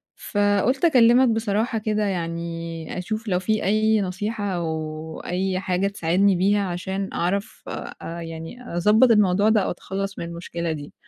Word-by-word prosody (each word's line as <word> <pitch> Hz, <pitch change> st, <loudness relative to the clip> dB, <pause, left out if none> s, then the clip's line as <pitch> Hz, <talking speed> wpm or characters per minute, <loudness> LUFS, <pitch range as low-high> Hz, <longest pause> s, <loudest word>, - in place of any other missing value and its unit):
فقُلت 205 Hz, -, +1 dB
أكلِّمك 250 Hz, -4 st, +6 dB
بصراحة 225 Hz, +1 st, 0 dB
كده 215 Hz, 0 st, 0 dB
يعني 170 Hz, -3 st, -4 dB
أشوف 215 Hz, +5 st, -4 dB
لو 180 Hz, -3 st, +1 dB
في 215 Hz, +3 st, 0 dB
أي 215 Hz, +1 st, +3 dB
نصيحة 205 Hz, +3 st, -3 dB
أو 160 Hz, -1 st, -4 dB
أي 185 Hz, +1 st, -1 dB
حاجة 190 Hz, 0 st, 0 dB
تساعدني 195 Hz, 0 st, +2 dB
بيها، 200 Hz, +3 st, +2 dB
عشان 190 Hz, +2 st, -3 dB
أعرف 195 Hz, +4 st, -2 dB
آآ 170 Hz, +1 st, -6 dB
يعني 165 Hz, +8 st, -8 dB
أضبط 210 Hz, +7 st, +5 dB
الموضوع 205 Hz, -1 st, +4 dB
ده 220 Hz, -1 st, +4 dB
أو -, -, -1 dB
أتخلَّص 195 Hz, +2 st, -5 dB
من -, -, -3 dB
المُشكلة 170 Hz, 0 st, -4 dB
دي. 150 Hz, -2 st, -6 dB
195 Hz, 145 wpm, -23 LUFS, 170-215 Hz, -, أكلِّمك